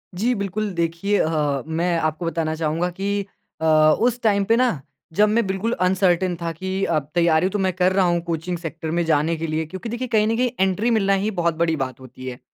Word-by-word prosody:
जी। 230 +7 +1
बिल्कुल 200 +1 -2
देखिए 170 +4 0
अ, 150 -4 0
मैं 170 +2 0
आपको 155 +2 -2
बताना 165 -1 -1
चाहूँगा 160 +2 -1
कि 200 +3 -2 0.4
अ, - - 0 0.3
उस 245 +1 +1
टाइम 200 -3 +2
पे 225 - +3
ना 235 - +1 0.3
जब 210 +5 +4
मैं 225 +1 +2
बिल्कुल 195 +4 -1
अनसर्टेन 185 -1 +2
था 170 0 -2
कि 190 +4 -3
अब 150 -3 -1
तैयारी 170 +1 +3
तो 205 - -2
मैं 190 -1 +1
कर 185 +1 +2
रहा 190 -1 +3
हूँ 175 -1 +1
कोचिंग 170 +1 -3
सेक्टर 165 -1 -5
में 170 +1 +1
जाने 160 +1 +2
के 165 +1 -3
लिए 155 +1 -1
क्योंकि 190 +8 -7
देखिए 240 +3 -3
कहीं 215 -3 +2
न 225 - +1
कहीं 250 0 +1
एंट्री 190 +5 +1
मिलना 200 -3 +2
ही 215 - 0
बहुत 170 -4 0
बड़ी 165 -1 +1
बात 130 -4 -4
होती 130 0 -11
है। 125 0 -6
175 Hz, 220 wpm, -22 LUFS, 160-200 Hz, 0.4 s, जब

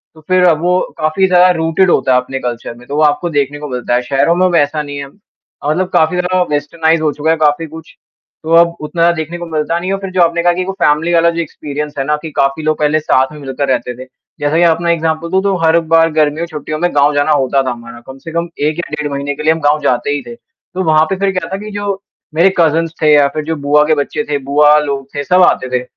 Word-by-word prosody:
तो 160 - -16
फिर 185 0 +3
वो 180 +3 +1 0.2
काफ़ी 155 +5 +1
ज़्यादा 180 0 +5
रूटेड 165 +3 +1
होता 130 -1 +2
है - - +5
अपने 135 +1 -6
कल्चर 120 -2 -5
में 120 +1 -16
तो 140 - -5
वो 155 - +1
आपको 150 +4 +1
देखने 145 -1 -1
को 150 - -6
मिलता 125 -1 -2
है। 125 - +1
शहरों 135 +6 +1
में 185 +1 +2
वैसा 155 -3 +1
नहीं 145 -1 -7
है 140 - -5
अ, 145 -2 -11
मतलब 180 +4 0
काफ़ी 160 +3 +2
ज़्यादा 180 +1 0
वेस्टर्नाइज़ 160 +2 0
हो 155 -1 +1
चुका 155 +2 0
है 165 - +1
काफ़ी 155 +1 +1
कुछ 160 +1 -12 0.5
तो 160 +1 -1
अब 170 0 +4
उतना 160 +3 -4
ज़्यादा 170 0 +4
देखने 160 +2 -5
को 175 - -6
मिलता 160 +1 -1
नहीं 180 +2 -4
है। - - 0
और - - -6
फिर 195 - -5
जो 185 -1 +1
आपने 170 0 +2
कहा 175 0 +3
कि 180 - -3
एक 180 - -4
वो 195 - -3
फैमिली 160 +2 +2
बाला 170 0 +4
जो 170 - -4
एक्सपीरियंस 150 -2 -6
है 135 - 0
ना, 150 +2 +1
कि 155 +1 -8
काफ़ी 140 +2 0
लोग 155 0 0
पहले 150 +1 +2
साथ 130 -3 +1
में 150 - -11
मिलकर 135 0 -4
रहते 125 -1 -1
थे। 130 - -9 0.3
जैसा 145 +2 0
कि 175 - +4
आपना 170 0 +2
एक्ज़ाम्पल 165 0 -1
दूँ 190 0 +2
तो 200 -1 +1
हर 165 +1 +4
बार 165 0 +4
गर्मियों 155 +1 +1
छुट्टियों 155 -1 -6
में 175 +1 +1
गाँव 145 +1 +3
जाना 145 +1 +1
होता 135 -2 +2
था 130 - -2
हमारा 120 0 -9
कम 135 0 -10
से 165 - -6
कम 170 +1 -2 0.2
1 155 - -2
या 170 - -5
डेढ़ 150 -1 -4
महीने 140 +1 -3
के 150 - -7
लिए 160 +1 +4
हम 160 - -5
गाँव 145 +1 +2
जाते 125 -1 0
ही 145 0 -1
थे, 235 - -8
तो 235 -8 -9
वहाँ 155 -2 +3
पे 195 - 0
फिर 195 0 +1
क्या - - -2
था - - -1
कि 215 - -8
जो 200 -1 -3 0.3
मेरे 180 +4 +4
कज़िन्स 165 0 +2
थे 155 -1 +4
या 145 -1 +5
फिर 155 - -2
जो 160 +1 -2
बुआ 145 0 +2
के 155 - +3
बच्चे 145 +1 -2
थे 145 - 0
बुआ 150 +2 +4
लोग 140 -2 -3
थे 145 - -2
सब 180 +6 +3
आते 130 - +2
थे 125 - -4
155 Hz, 275 wpm, -14 LUFS, 145-170 Hz, 0.5 s, ज़्यादा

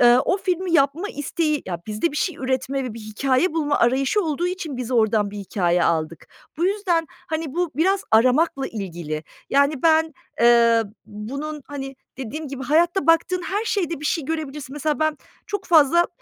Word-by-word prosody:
eee, 240 0 +7
o 370 - +2
filmi 365 -2 -1
yapma 295 +6 +2
isteği, 305 -1 -1
ya, 175 -2 -4
bizde 215 +10 -1
bir - - -5
şey 350 0 -1
üretme 265 +1 -2
ve 240 - -5
bir 230 - -8
hikâye 255 - 0
bulma 295 -3 0
arayışı 265 - +2
olduğu 325 +2 -1
için 355 -6 -4
biz 250 -1 -5
oradan 220 -4 +2
bir 205 - -7
hikâye 180 -3 0
aldık. 160 -1 -1 0.3
Bu 335 - 0
yüzden, 375 -5 0 0.2
hani, 320 0 -2
bu 350 -1 0
biraz 380 +5 +2
aramakla 265 +5 +3
ilgili. 170 - -5 0.3
Yani, 280 0 +2
ben, 320 -1 +4 0.3
eee, 235 -1 +5 0.2
bunun, 275 +8 -6
hani, 270 -2 -7 0.2
dediğim 275 +4 -5
gibi 270 -1 -6
hayatta 330 +4 +2
baktığın 335 +2 +3
her 405 +5 -2
şeyde 350 -9 -1
bir - - -8
şey 310 -1 0
görebilirsin. 295 -3 -5
Mesela 300 +1 -1
ben 310 -1 +1 0.3
çok 410 - -4
fazla, 335 +1 +5
285 Hz, 175 wpm, -22 LUFS, 240-330 Hz, 0.3 s, eee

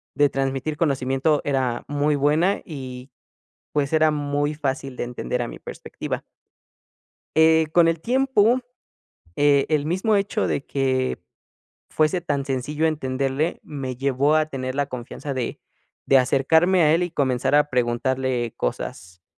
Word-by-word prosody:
de 145 -1 +4
transmitir 135 +2 -2
conocimiento 140 0 +1
era 130 -4 0
muy 145 +1 +1
buena 155 +7 +2
y, 130 -3 -8 0.6
pues, 145 -2 0
era 155 0 +4
muy 145 0 -1
fácil 135 -3 -3
de - - -2
entender 125 0 -3
a 120 - -2
mi - - -9
perspectiva. 475 - -6 1.2
Eh, 160 0 +5
con 175 -1 +6
el 165 -1 +1
tiempo, 250 +1 +2 0.8
eh, 145 -1 +4
el 150 -2 +1
mismo 190 +6 +1
hecho 200 +1 0
de 140 - -2
que 130 -2 0 0.7
fuese 155 +3 +1
tan 145 -4 -2
sencillo 145 +4 -1
entenderle, 135 +1 -1
me 135 -3 -5
llevó 140 +3 +1
a 155 0 +3
tener 130 -3 -4
la 145 0 0
confianza 130 +2 -6
de 125 -3 -4 0.5
de 135 - +6
acercarme 160 +8 +3
a 150 - +5
él, 170 - +2
y 175 - -2
comenzar 130 -2 0
a 150 0 +4
preguntarle 125 0 0
cosas, 90 +7 -5
145 Hz, 140 wpm, -23 LUFS, 130-155 Hz, 1.2 s, con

